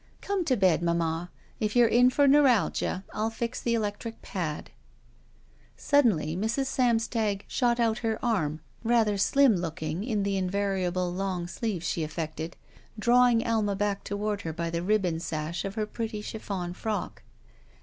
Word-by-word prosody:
"Come 400 Hz, -2 st, -1 dB
to 255 Hz, -5 st, +2 dB
bed, 185 Hz, -4 st, +3 dB
mamma. 170 Hz, 0 st, 0 dB, 0.3 s
K 215 Hz, -, +1 dB
you're 240 Hz, -1 st, +6 dB
in 245 Hz, +3 st, +5 dB
for 285 Hz, +2 st, +3 dB
neu 290 Hz, +2 st, +6 dB
ralgia, 235 Hz, -7 st, +2 dB
I'll 215 Hz, +1 st, 0 dB
fix 235 Hz, +1 st, -4 dB
the 235 Hz, -1 st, +1 dB
electric 220 Hz, +1 st, -3 dB
pad." 160 Hz, -6 st, -4 dB, 1.1 s
Suddenly 215 Hz, -, +2 dB
Mrs. 220 Hz, +8 st, 0 dB
Samstag 225 Hz, -5 st, 0 dB
shot 240 Hz, -2 st, +1 dB
out 225 Hz, -1 st, +2 dB
her 225 Hz, -2 st, -1 dB
arm, 160 Hz, -10 st, 0 dB, 0.2 s
rather 225 Hz, -3 st, +3 dB
slim 260 Hz, +1 st, +4 dB
looking 165 Hz, 0 st, -3 dB
in 215 Hz, -4 st, -1 dB
the 200 Hz, -1 st, 0 dB
invariable 185 Hz, -2 st, -1 dB
long 185 Hz, -2 st, -2 dB
sleeve 180 Hz, 0 st, -3 dB
she 170 Hz, -, -1 dB
aflEected, 160 Hz, +1 st, -4 dB, 0.4 s
drawing 240 Hz, +1 st, +4 dB
Alma 215 Hz, -3 st, +1 dB
back 200 Hz, 0 st, -1 dB
toward 205 Hz, 0 st, -2 dB
her 160 Hz, -, -4 dB
by 170 Hz, +1 st, -3 dB
the 170 Hz, 0 st, -1 dB
ribbon 185 Hz, -4 st, +1 dB
sash 160 Hz, +1 st, -3 dB
of 195 Hz, +1 st, -5 dB
her 215 Hz, -1 st, -1 dB
pretty 220 Hz, -1 st, -5 dB
chiflEon 195 Hz, -5 st, -4 dB
frock. 215 Hz, 0 st, -4 dB
205 Hz, 155 wpm, -28 LUFS, 175-230 Hz, 1.1 s, you're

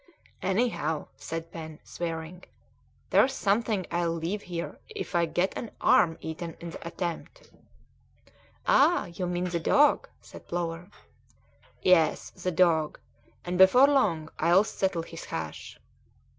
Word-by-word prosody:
"Anyhow," 190 Hz, -7 st, -1 dB
said 165 Hz, +10 st, -6 dB
Pen, 160 Hz, -2 st, -8 dB
swearing, 165 Hz, +1 st, -5 dB, 0.7 s
"there's 265 Hz, -, +4 dB
something 210 Hz, -3 st, 0 dB
I'll 170 Hz, 0 st, 0 dB
leave 170 Hz, +5 st, -3 dB
here 175 Hz, -2 st, -6 dB
if 430 Hz, -, -6 dB
I 170 Hz, -1 st, +2 dB
get 180 Hz, +4 st, 0 dB
an 235 Hz, -, -5 dB
arm 165 Hz, -2 st, +4 dB
eaten 160 Hz, +1 st, -6 dB
in 170 Hz, 0 st, -7 dB
the 170 Hz, -, -8 dB
attempt." 175 Hz, -, -6 dB, 1.1 s
"Ah! 350 Hz, -, +4 dB
you 180 Hz, +1 st, -3 dB
mean 175 Hz, 0 st, -1 dB
the 170 Hz, -1 st, -1 dB
dog," 290 Hz, -, +3 dB
said -, -, -14 dB
Plover. 170 Hz, +1 st, -4 dB, 0.9 s
"Yes, 165 Hz, -4 st, +3 dB
the 185 Hz, -, -4 dB
dog; 165 Hz, -3 st, +2 dB, 0.5 s
and 180 Hz, +1 st, -2 dB
before 220 Hz, +8 st, +8 dB
long 190 Hz, -, +2 dB
I'll 175 Hz, +5 st, +5 dB
settle 190 Hz, -5 st, -1 dB
his 165 Hz, 0 st, -9 dB
hash!" 80 Hz, -1 st, -6 dB
175 Hz, 130 wpm, -28 LUFS, 165-190 Hz, 1.1 s, before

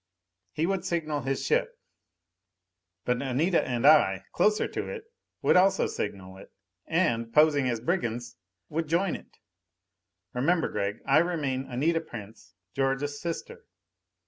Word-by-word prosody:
He 155 Hz, +2 st, -1 dB
would 195 Hz, +1 st, -1 dB
signal 155 Hz, -4 st, -2 dB
his 135 Hz, +1 st, -2 dB
ship. -, -, 0 dB, 1.3 s
But 125 Hz, 0 st, 0 dB
Anita 145 Hz, +7 st, +1 dB
and 125 Hz, 0 st, -2 dB
I, 95 Hz, -10 st, +5 dB
closer 210 Hz, 0 st, +2 dB
to -, -, -4 dB
it, 465 Hz, -2 st, -6 dB, 0.4 s
would -, -, +4 dB
also 190 Hz, +1 st, +4 dB
signal 95 Hz, -2 st, -5 dB
it; 95 Hz, -, -14 dB, 0.4 s
and, 115 Hz, -1 st, +1 dB
posing 145 Hz, -1 st, +4 dB
as 120 Hz, -2 st, -1 dB
brigands, 120 Hz, -5 st, -2 dB, 0.3 s
would 160 Hz, +4 st, -2 dB
join 170 Hz, +4 st, +1 dB
it! -, -, -13 dB, 1.0 s
"Remember, 160 Hz, +7 st, +1 dB
Gregg, 100 Hz, 0 st, -3 dB
I 140 Hz, +2 st, +5 dB
remain 145 Hz, -6 st, -1 dB
Anita 155 Hz, +7 st, 0 dB
Prince, 110 Hz, -8 st, -11 dB, 0.2 s
George's 135 Hz, +2 st, -1 dB
sister." 170 Hz, -1 st, -6 dB
140 Hz, 130 wpm, -28 LUFS, 120-165 Hz, 1.3 s, I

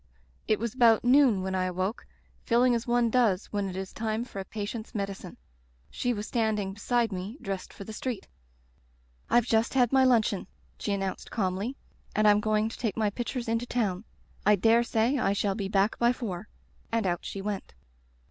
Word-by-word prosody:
It 215 Hz, -, +3 dB
was 230 Hz, 0 st, -3 dB
about 235 Hz, -4 st, +5 dB
noon 245 Hz, -6 st, +5 dB
when 190 Hz, 0 st, -2 dB
I 185 Hz, -1 st, +1 dB
awoke, 185 Hz, +5 st, -3 dB, 0.4 s
feeling 245 Hz, +1 st, +3 dB
as 235 Hz, 0 st, -1 dB
one 240 Hz, -1 st, +2 dB
does 220 Hz, -6 st, +2 dB
when 200 Hz, -1 st, -1 dB
it 185 Hz, -, -7 dB
is 190 Hz, 0 st, -5 dB
time 225 Hz, +1 st, -2 dB
for 220 Hz, -5 st, -8 dB
a -, -, -3 dB
patient's 220 Hz, +3 st, -6 dB
medicine. 195 Hz, -3 st, -5 dB, 0.5 s
She 245 Hz, -, -1 dB
was 210 Hz, -2 st, -3 dB
standing 215 Hz, -5 st, 0 dB
beside 230 Hz, +2 st, 0 dB
me 190 Hz, +6 st, -5 dB
dressed 195 Hz, -1 st, -5 dB
for -, -, -9 dB
the 220 Hz, -, -8 dB
street. 245 Hz, 0 st, -4 dB, 1.0 s
"^Fve 240 Hz, -2 st, +4 dB
just 225 Hz, +1 st, +1 dB
had 245 Hz, -3 st, +4 dB
my 265 Hz, -1 st, +6 dB
luncheon/ 220 Hz, -7 st, +2 dB, 0.3 s
she 210 Hz, -, -2 dB
an 200 Hz, -, -1 dB
nounced 190 Hz, -1 st, -4 dB
calmly, 200 Hz, +4 st, -2 dB, 0.4 s
'and 215 Hz, -, +3 dB
Fm 210 Hz, 0 st, +6 dB
going 215 Hz, 0 st, +1 dB
to 225 Hz, -, -8 dB
take 225 Hz, -4 st, -2 dB
my 215 Hz, -2 st, +1 dB
pictures 240 Hz, +2 st, -4 dB
into 230 Hz, +2 st, -1 dB
town. 210 Hz, -6 st, -1 dB, 0.4 s
I 210 Hz, +1 st, +5 dB
dare 225 Hz, +4 st, +4 dB
say 235 Hz, +3 st, +1 dB
I 195 Hz, -, +2 dB
shall 200 Hz, 0 st, 0 dB
be 200 Hz, -1 st, -3 dB
back 195 Hz, +2 st, +1 dB
by 240 Hz, +1 st, +4 dB
four,* 210 Hz, -5 st, -5 dB, 0.4 s
and 225 Hz, -2 st, +1 dB
out 175 Hz, -2 st, -1 dB
she 195 Hz, -, -5 dB
went. 195 Hz, -, -5 dB
215 Hz, 195 wpm, -28 LUFS, 195-235 Hz, 1.0 s, my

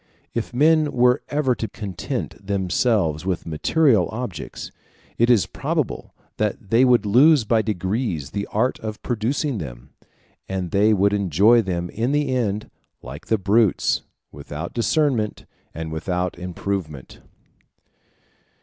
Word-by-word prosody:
If 115 Hz, -, -3 dB
men 155 Hz, +3 st, +3 dB
were 125 Hz, +2 st, +3 dB
ever 145 Hz, -3 st, +1 dB
to 115 Hz, -, -4 dB
content 100 Hz, -2 st, -5 dB
themselves 95 Hz, -4 st, +1 dB
with 95 Hz, -2 st, -2 dB
material 105 Hz, -, +2 dB
objects, 110 Hz, -, -6 dB, 0.5 s
it 120 Hz, +1 st, +4 dB
is 115 Hz, -6 st, +4 dB
probable -, -, -3 dB, 0.2 s
that 105 Hz, -1 st, -2 dB
they 115 Hz, +3 st, +5 dB
would 125 Hz, -3 st, +4 dB
lose 130 Hz, +6 st, +5 dB
by 110 Hz, +1 st, +3 dB
degrees 95 Hz, -, -2 dB
the 100 Hz, +2 st, -3 dB
art 120 Hz, +5 st, 0 dB
of 110 Hz, -1 st, -6 dB
producing 125 Hz, +2 st, -1 dB
them; -, -, -9 dB, 0.6 s
and 95 Hz, -2 st, -3 dB
they 105 Hz, +2 st, +4 dB
would 100 Hz, 0 st, +3 dB
enjoy 100 Hz, +4 st, +4 dB
them 90 Hz, -3 st, -3 dB
in 120 Hz, +5 st, -1 dB
the 145 Hz, -2 st, +1 dB
end, 110 Hz, -4 st, -1 dB, 0.3 s
like 65 Hz, +4 st, -9 dB
the 110 Hz, -, +2 dB
brutes, 105 Hz, +1 st, +2 dB, 0.3 s
without 80 Hz, +4 st, -7 dB
discernment 120 Hz, -3 st, 0 dB, 0.3 s
and 80 Hz, 0 st, -6 dB
without 90 Hz, +3 st, -2 dB
improvement. 90 Hz, -5 st, -5 dB
105 Hz, 130 wpm, -22 LUFS, 90-120 Hz, 0.6 s, they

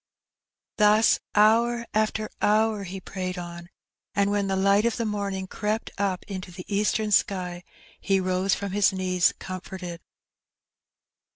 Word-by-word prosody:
Thus 210 Hz, +1 st, +5 dB, 0.2 s
hour 235 Hz, +3 st, +4 dB
after 215 Hz, 0 st, 0 dB
hour 215 Hz, -1 st, +2 dB
he 190 Hz, +1 st, -6 dB
prayed 185 Hz, 0 st, -5 dB
on, 175 Hz, 0 st, -8 dB, 0.5 s
and 200 Hz, 0 st, +2 dB
when 205 Hz, -1 st, 0 dB
the 195 Hz, -, 0 dB
light 200 Hz, +2 st, +3 dB
of 235 Hz, 0 st, 0 dB
the 230 Hz, -, -1 dB
morning 200 Hz, -3 st, -2 dB
crept 210 Hz, +3 st, -3 dB
up 195 Hz, -3 st, -1 dB
into 185 Hz, -2 st, -7 dB
the 180 Hz, +1 st, -9 dB
eastern 210 Hz, +1 st, 0 dB
sky, 180 Hz, -3 st, +1 dB, 0.4 s
he 195 Hz, -1 st, +1 dB
rose 185 Hz, +1 st, +1 dB
from 200 Hz, -1 st, -5 dB
his 205 Hz, 0 st, +3 dB
knees 185 Hz, -2 st, +2 dB
comforted. 185 Hz, -2 st, -7 dB
200 Hz, 135 wpm, -26 LUFS, 185-210 Hz, 0.5 s, Thus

